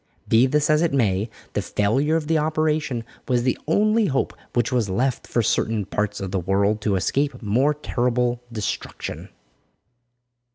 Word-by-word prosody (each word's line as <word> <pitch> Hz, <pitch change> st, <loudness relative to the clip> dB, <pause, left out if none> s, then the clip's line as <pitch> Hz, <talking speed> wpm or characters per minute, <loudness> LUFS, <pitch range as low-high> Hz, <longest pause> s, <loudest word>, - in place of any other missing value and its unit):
Be 115 Hz, +4 st, +5 dB
this 150 Hz, +2 st, +2 dB
as 155 Hz, -1 st, +3 dB
it 170 Hz, -, +2 dB
may, 105 Hz, -4 st, +1 dB, 0.2 s
the -, -, 0 dB
failure 130 Hz, +10 st, +1 dB
of 165 Hz, -2 st, 0 dB
the 160 Hz, 0 st, +2 dB
operation 155 Hz, -5 st, 0 dB, 0.2 s
was 125 Hz, -2 st, +1 dB
the 125 Hz, -, +1 dB
only 215 Hz, +5 st, +3 dB
hope 135 Hz, -1 st, -1 dB, 0.2 s
which 120 Hz, 0 st, +1 dB
was 120 Hz, -5 st, +1 dB
left 125 Hz, +7 st, -1 dB
for 120 Hz, -, +1 dB
certain 110 Hz, 0 st, 0 dB
parts 105 Hz, +1 st, -2 dB
of 95 Hz, -2 st, -4 dB
the 95 Hz, -, 0 dB
world 100 Hz, +4 st, +1 dB
to 105 Hz, -2 st, +1 dB
escape 135 Hz, -, 0 dB
more 130 Hz, +8 st, +2 dB
terrible 125 Hz, -3 st, 0 dB
destruction. 110 Hz, -3 st, -5 dB
125 Hz, 160 wpm, -23 LUFS, 105-150 Hz, 0.2 s, Be